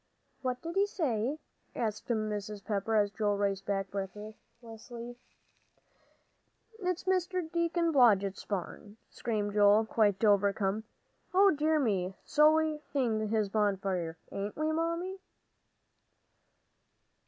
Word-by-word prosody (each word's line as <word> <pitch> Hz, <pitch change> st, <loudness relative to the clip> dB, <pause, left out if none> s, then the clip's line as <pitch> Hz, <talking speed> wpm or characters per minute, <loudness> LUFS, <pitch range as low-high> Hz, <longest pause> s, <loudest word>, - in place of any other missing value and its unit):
"What 255 Hz, -1 st, -3 dB
did 335 Hz, +3 st, -4 dB
he 400 Hz, +1 st, +4 dB
say?" 270 Hz, -, -1 dB, 0.4 s
asked 215 Hz, -2 st, -3 dB
Mrs. 210 Hz, -2 st, -3 dB
Pepper, 210 Hz, +1 st, -1 dB
as 205 Hz, -1 st, +3 dB
Joel 205 Hz, -1 st, 0 dB
raced 195 Hz, -1 st, -1 dB
back 195 Hz, -1 st, -1 dB
breathlessly. 225 Hz, +4 st, -8 dB, 1.6 s
"It's 365 Hz, -1 st, 0 dB, 0.3 s
Deacon 340 Hz, 0 st, +1 dB
Blodgett's 200 Hz, -8 st, +4 dB
barn," 205 Hz, +2 st, -5 dB
screamed 210 Hz, -3 st, -2 dB
Joel, 210 Hz, +1 st, +5 dB
quite 215 Hz, -2 st, +1 dB
overcome. 200 Hz, +1 st, +2 dB, 0.5 s
"O 395 Hz, +1 st, +7 dB
dear 310 Hz, 0 st, +2 dB
me! 195 Hz, -7 st, 0 dB
So 305 Hz, 0 st, +5 dB
we 315 Hz, 0 st, +2 dB
are 300 Hz, -, -8 dB
seeing 225 Hz, -6 st, 0 dB
his 215 Hz, -2 st, +1 dB
bonfire, 195 Hz, -5 st, -1 dB
ain't 200 Hz, +1 st, -4 dB
we, 310 Hz, +1 st, 0 dB
Mammy?" 335 Hz, +4 st, -2 dB
220 Hz, 110 wpm, -31 LUFS, 205-305 Hz, 1.6 s, O